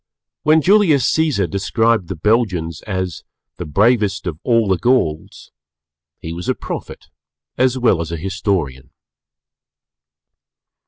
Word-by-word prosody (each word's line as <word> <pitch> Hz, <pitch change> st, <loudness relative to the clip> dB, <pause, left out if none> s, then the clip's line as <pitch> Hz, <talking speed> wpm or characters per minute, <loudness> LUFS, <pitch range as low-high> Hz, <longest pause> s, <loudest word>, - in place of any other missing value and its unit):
When 155 Hz, 0 st, +3 dB
Julius 180 Hz, -, +4 dB
Cæsar 150 Hz, -, +1 dB
described 105 Hz, +2 st, 0 dB
the 95 Hz, -, -5 dB
Belgians 90 Hz, -5 st, 0 dB
as 95 Hz, -4 st, -3 dB, 0.3 s
the -, -, -6 dB
"Bravest 100 Hz, -, +1 dB
of 80 Hz, -4 st, -4 dB
all 115 Hz, -3 st, +2 dB
the 95 Hz, -3 st, +1 dB
Gauls" 120 Hz, -12 st, -1 dB, 0.7 s
he 80 Hz, -, -6 dB
was 85 Hz, +1 st, -5 dB
a -, -, +1 dB
Prophet -, -, -7 dB, 0.5 s
as 130 Hz, 0 st, +1 dB
well 115 Hz, -9 st, +2 dB
as 85 Hz, 0 st, -5 dB
a 85 Hz, -, -3 dB
Historian. 85 Hz, -7 st, -3 dB
100 Hz, 120 wpm, -18 LUFS, 85-120 Hz, 0.7 s, Julius